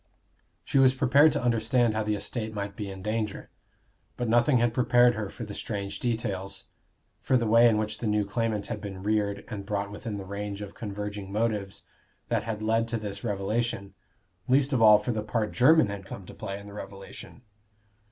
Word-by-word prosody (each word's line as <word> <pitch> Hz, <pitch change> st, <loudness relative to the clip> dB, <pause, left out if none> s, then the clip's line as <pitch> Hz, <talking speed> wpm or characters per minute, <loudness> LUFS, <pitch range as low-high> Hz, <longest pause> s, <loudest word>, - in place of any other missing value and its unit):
She 135 Hz, -, +1 dB
was 130 Hz, -1 st, +5 dB
prepared 140 Hz, +4 st, +5 dB
to -, -, -2 dB
understand 115 Hz, 0 st, +2 dB
how 110 Hz, -, 0 dB
the 105 Hz, 0 st, 0 dB
estate 110 Hz, +2 st, -4 dB
might 100 Hz, -1 st, -4 dB
be 105 Hz, -1 st, -5 dB
in 95 Hz, -1 st, -8 dB
danger; 105 Hz, -1 st, -3 dB, 0.7 s
but 120 Hz, -, -2 dB
nothing 120 Hz, +4 st, +4 dB
had 120 Hz, -1 st, +2 dB
prepared 120 Hz, 0 st, +4 dB
her 105 Hz, -3 st, -4 dB
for 120 Hz, -, -8 dB
the 105 Hz, -, -8 dB
strange 100 Hz, -2 st, -4 dB
details 100 Hz, -5 st, -3 dB, 0.6 s
for 130 Hz, -, +3 dB
the 120 Hz, -, 0 dB
way 115 Hz, +2 st, +6 dB
in 110 Hz, -, +2 dB
which 110 Hz, 0 st, -2 dB
the 115 Hz, -, -2 dB
new 105 Hz, -1 st, +1 dB
claimant 110 Hz, 0 st, -1 dB
had 110 Hz, -3 st, -5 dB
been 95 Hz, -2 st, -7 dB
reared 100 Hz, -1 st, 0 dB
and 105 Hz, -3 st, -6 dB
brought 100 Hz, 0 st, -3 dB
within 105 Hz, 0 st, -5 dB
the 100 Hz, -, -7 dB
range 100 Hz, +1 st, -5 dB
of 105 Hz, -1 st, -7 dB
converging 105 Hz, -2 st, -6 dB
motives 105 Hz, -2 st, -2 dB, 0.5 s
that -, -, +1 dB
had 110 Hz, -1 st, -4 dB
led 115 Hz, +1 st, +2 dB
to 115 Hz, 0 st, -2 dB
this 100 Hz, -2 st, -6 dB
revelation, 100 Hz, -1 st, -2 dB, 0.5 s
least 135 Hz, +2 st, +3 dB
of 125 Hz, -, +2 dB
all 105 Hz, -1 st, +9 dB
for 105 Hz, +4 st, -2 dB
the 110 Hz, -2 st, -2 dB
part 105 Hz, 0 st, -1 dB
Jermyn 150 Hz, -1 st, +5 dB
had 100 Hz, -1 st, -5 dB
come 95 Hz, -1 st, -8 dB
to -, -, -11 dB
play 100 Hz, 0 st, -5 dB
in 100 Hz, -, -12 dB
the 100 Hz, -, -10 dB
revelation. 100 Hz, +4 st, -10 dB
105 Hz, 200 wpm, -27 LUFS, 100-115 Hz, 0.7 s, all